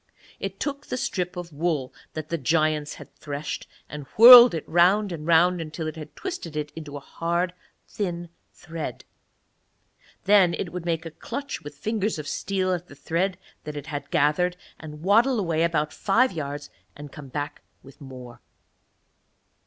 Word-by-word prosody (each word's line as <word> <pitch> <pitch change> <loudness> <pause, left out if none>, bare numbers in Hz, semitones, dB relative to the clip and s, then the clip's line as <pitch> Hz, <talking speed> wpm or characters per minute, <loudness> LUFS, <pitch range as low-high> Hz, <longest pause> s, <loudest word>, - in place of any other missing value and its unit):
It - - -5
took 285 -1 -4
the - - -3
strip 180 -6 -3
of 175 -2 -7
wool 150 -4 -1 0.2
that 155 -1 -6
the 170 - -1
giants 155 +1 +1
had - - -13
threshed, 145 0 -6 0.2
and 150 -2 -8
whirled 240 -2 +11
it 160 - -5
round 185 +5 +3
and 160 -2 -6
round 170 +1 +4
until 155 0 -5
it 155 - -4
had 155 -2 -10
twisted 345 - -6
it 150 -1 -3
into 150 -3 -7
hard 170 +5 -2 0.3
thin 175 -4 -4 0.2
thread. 165 -2 -7 1.2
Then 195 -4 +5
it 175 - -5
would 180 -1 -5
make 165 -1 -1
a 165 - -6
clutch 280 - -6
with 145 0 -10
fingers 210 +4 -1
of 150 -2 -6
steel 185 -1 -1
at 175 0 -4
the 145 - -13
thread 170 +6 -1 0.3
that 150 -1 -6
it 145 - -6
had 145 -2 -6
gathered, 175 +3 +2 0.2
and 150 -1 -10
waddle 230 +6 +4
away 165 -5 0
about 160 -2 0
five 235 +6 +2
yards 145 -3 -6 0.2
and 145 -1 -10
come 145 -3 -10
back 145 +2 -5 0.2
with 135 +2 -16
more. 125 -3 -11
165 Hz, 165 wpm, -25 LUFS, 150-180 Hz, 1.2 s, whirled